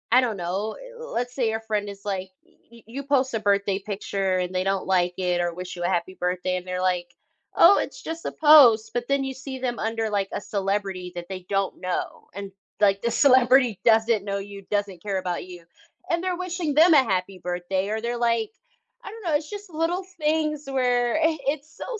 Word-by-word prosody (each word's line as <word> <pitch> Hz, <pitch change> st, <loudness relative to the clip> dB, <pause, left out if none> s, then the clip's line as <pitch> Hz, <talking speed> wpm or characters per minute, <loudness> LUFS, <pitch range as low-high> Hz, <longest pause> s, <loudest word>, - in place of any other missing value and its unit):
I 250 Hz, +2 st, +7 dB
don't 230 Hz, -5 st, -1 dB
know. 190 Hz, +5 st, -3 dB, 0.2 s
L 475 Hz, +1 st, -9 dB
let's 245 Hz, +1 st, -2 dB
say 245 Hz, -3 st, 0 dB
your 220 Hz, 0 st, -2 dB
friend 210 Hz, -2 st, -2 dB
is, 200 Hz, 0 st, -10 dB
like, 190 Hz, -2 st, -3 dB, 0.4 s
you 235 Hz, 0 st, -16 dB
you 255 Hz, +6 st, -6 dB
post 270 Hz, -2 st, +1 dB
a 225 Hz, -, 0 dB
birthday 200 Hz, -1 st, +1 dB
picture 195 Hz, -2 st, -2 dB
and 180 Hz, 0 st, -2 dB
they 185 Hz, 0 st, 0 dB
don't 195 Hz, 0 st, -1 dB
like 180 Hz, -2 st, +2 dB
it 180 Hz, -1 st, 0 dB
or 175 Hz, -1 st, -1 dB
wish 180 Hz, +1 st, -7 dB
you 175 Hz, -, -5 dB
a -, -, +1 dB
happy 185 Hz, +1 st, -1 dB
birthday, 180 Hz, +1 st, -1 dB
and 180 Hz, 0 st, -8 dB
they're, 180 Hz, 0 st, -2 dB
like, 180 Hz, -1 st, 0 dB, 0.5 s
"Oh, 365 Hz, +4 st, +7 dB
it's -, -, -5 dB
just 325 Hz, +1 st, -6 dB
a -, -, -2 dB
post." 275 Hz, -8 st, +6 dB
But, 240 Hz, 0 st, -2 dB
then 275 Hz, 0 st, +1 dB
you 265 Hz, 0 st, -3 dB
see 265 Hz, 0 st, -7 dB
them 245 Hz, -2 st, -2 dB
under, 225 Hz, 0 st, -1 dB
like, 200 Hz, -2 st, 0 dB
a -, -, -3 dB
celebrity 195 Hz, -3 st, -2 dB
that 175 Hz, 0 st, -6 dB
they 185 Hz, -2 st, -7 dB
don't 195 Hz, -1 st, -1 dB
know, 180 Hz, -1 st, -4 dB
and, 200 Hz, 0 st, -6 dB, 0.3 s
like, 200 Hz, -1 st, +4 dB
the 235 Hz, -, 0 dB
celebrity 255 Hz, -5 st, +4 dB
doesn't 225 Hz, -2 st, +4 dB
know 200 Hz, -1 st, -2 dB
you, 200 Hz, 0 st, -9 dB
doesn't 200 Hz, -4 st, -2 dB
care 200 Hz, -1 st, -2 dB
about 180 Hz, -2 st, -3 dB
you, 180 Hz, -2 st, -11 dB, 0.5 s
and 340 Hz, 0 st, +1 dB
they're 365 Hz, -1 st, -1 dB
wishing 360 Hz, -4 st, -2 dB
them 320 Hz, +4 st, +6 dB
a 280 Hz, -3 st, +7 dB
happy 190 Hz, -3 st, -2 dB
birthday, 180 Hz, +2 st, -2 dB
or 220 Hz, +1 st, -2 dB
they're, 240 Hz, +1 st, -2 dB
like, 230 Hz, -1 st, +1 dB, 0.5 s
I -, -, -7 dB
don't 450 Hz, 0 st, -11 dB
know, 320 Hz, -3 st, +1 dB
it's 300 Hz, 0 st, -2 dB
just 410 Hz, -1 st, -8 dB
little 335 Hz, +3 st, -1 dB, 0.2 s
things 305 Hz, -1 st, 0 dB
where 245 Hz, -2 st, +1 dB
it 320 Hz, 0 st, +2 dB
it's 295 Hz, +2 st, -2 dB
so -, -, -6 dB
215 Hz, 220 wpm, -25 LUFS, 190-270 Hz, 0.5 s, I